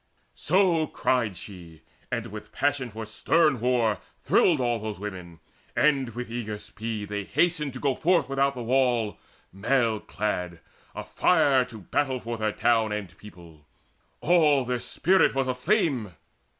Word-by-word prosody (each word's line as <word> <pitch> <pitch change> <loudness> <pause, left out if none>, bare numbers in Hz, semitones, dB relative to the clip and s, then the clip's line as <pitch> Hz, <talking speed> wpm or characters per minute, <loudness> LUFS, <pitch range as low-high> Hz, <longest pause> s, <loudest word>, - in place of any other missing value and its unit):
So 170 -2 +2
cried 115 -10 0
she, 85 -5 -11 0.3
and - - -2
with - - -9
passion 140 -2 -1
for 110 0 -7
stern 150 +5 +2
war 115 -3 +1 0.2
Thrilled 165 -5 +3
all 120 -2 0
those 110 -2 -5
women; 90 -5 -8 0.4
and 135 -5 +2
with 120 -1 -6
eager 110 -3 -4
speed 105 0 -6
They 105 0 -3
hasted 155 - 0
to 130 - -7
go 140 -2 +1
forth 165 +1 +2
without 135 0 +1
the 120 - -5
wall 120 -3 +1 0.3
Mail 115 +2 +1
clad, 90 -7 -3 0.4
afire 145 -7 +2
to 115 -4 -11
battle 130 - -1
for 120 0 -5
their 110 -1 0
town 115 -1 +1
And 100 -5 -5
people: 85 -7 -15 0.5
all 150 -6 +4
their 125 0 -1
spirit 185 +5 +2
was 135 -1 0
aflame. 130 - 0
120 Hz, 145 wpm, -26 LUFS, 105-140 Hz, 0.5 s, all